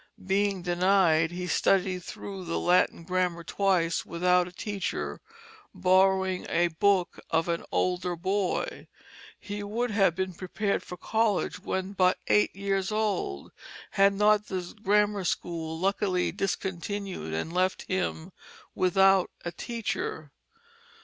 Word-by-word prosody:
Being 195 Hz, -1 st, +1 dB
denied 175 Hz, -2 st, +3 dB
he 180 Hz, +1 st, -5 dB
studied 185 Hz, +1 st, +2 dB
through 195 Hz, 0 st, -7 dB
the 165 Hz, -, -2 dB
Latin 175 Hz, -1 st, +2 dB
grammar 180 Hz, -1 st, -1 dB
twice 175 Hz, -2 st, +1 dB
without 180 Hz, +1 st, +2 dB
a -, -, -10 dB
teacher, 200 Hz, +1 st, -4 dB, 0.5 s
borrowing 190 Hz, 0 st, +2 dB
a 175 Hz, +1 st, +2 dB
book 185 Hz, +2 st, +1 dB
of 160 Hz, +1 st, +1 dB
an 170 Hz, -1 st, -1 dB
older 180 Hz, -1 st, 0 dB
boy. 195 Hz, -, -2 dB, 0.5 s
He 205 Hz, 0 st, -6 dB
would 225 Hz, +4 st, -2 dB
have 195 Hz, -5 st, +3 dB
been 190 Hz, 0 st, -2 dB
prepared 200 Hz, +3 st, -2 dB
for 180 Hz, -, -9 dB
college 220 Hz, +1 st, 0 dB
when 190 Hz, +1 st, -3 dB
but 185 Hz, -1 st, +3 dB
eight 210 Hz, -, +3 dB
years 195 Hz, 0 st, -1 dB
old, 205 Hz, -, -2 dB, 0.4 s
had 200 Hz, 0 st, +4 dB
not 210 Hz, +1 st, +3 dB
the 180 Hz, -2 st, -5 dB
grammar 210 Hz, -1 st, +2 dB
school 165 Hz, -2 st, -3 dB
luckily 190 Hz, 0 st, 0 dB
discontinued 190 Hz, -, -3 dB
and 160 Hz, -, -3 dB
left 185 Hz, +1 st, +1 dB
him 185 Hz, -1 st, -3 dB, 0.4 s
without 190 Hz, +1 st, +4 dB, 0.2 s
a 175 Hz, -, -2 dB
teacher. 210 Hz, -, -4 dB
185 Hz, 125 wpm, -28 LUFS, 175-200 Hz, 0.5 s, had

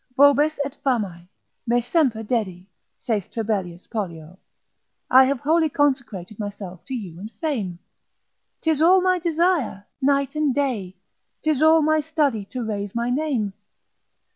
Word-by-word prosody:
Vobis 285 Hz, +2 st, +5 dB
et 280 Hz, -, -5 dB
famae, 200 Hz, -, -1 dB, 0.4 s
me 240 Hz, +1 st, +3 dB
semper 245 Hz, -3 st, +1 dB
dedi, 205 Hz, -6 st, -2 dB, 0.3 s
saith 220 Hz, -7 st, -2 dB
Trebellius 195 Hz, -6 st, -3 dB
Pollio, 180 Hz, -5 st, -6 dB, 0.7 s
I 260 Hz, +1 st, +8 dB
have 270 Hz, -1 st, -1 dB
wholly 320 Hz, +2 st, +2 dB
consecrated 245 Hz, -10 st, -1 dB
myself 200 Hz, -4 st, -7 dB
to 265 Hz, -, -4 dB
you 180 Hz, -8 st, -7 dB
and 210 Hz, +3 st, -7 dB
fame. 210 Hz, -, -3 dB, 0.8 s
'Tis 315 Hz, -2 st, +1 dB
all 365 Hz, +4 st, +6 dB
my 370 Hz, 0 st, +2 dB
desire, 335 Hz, -, 0 dB, 0.2 s
night 275 Hz, +1 st, +2 dB
and 300 Hz, -4 st, 0 dB
day, 220 Hz, -10 st, -2 dB, 0.5 s
'tis 310 Hz, -3 st, +1 dB
all 315 Hz, 0 st, +6 dB
my 310 Hz, +1 st, +3 dB
study 285 Hz, -9 st, 0 dB
to 250 Hz, +4 st, -5 dB
raise 205 Hz, -2 st, -4 dB
my 235 Hz, +1 st, 0 dB
name. 255 Hz, -8 st, -1 dB
245 Hz, 140 wpm, -23 LUFS, 200-300 Hz, 0.8 s, I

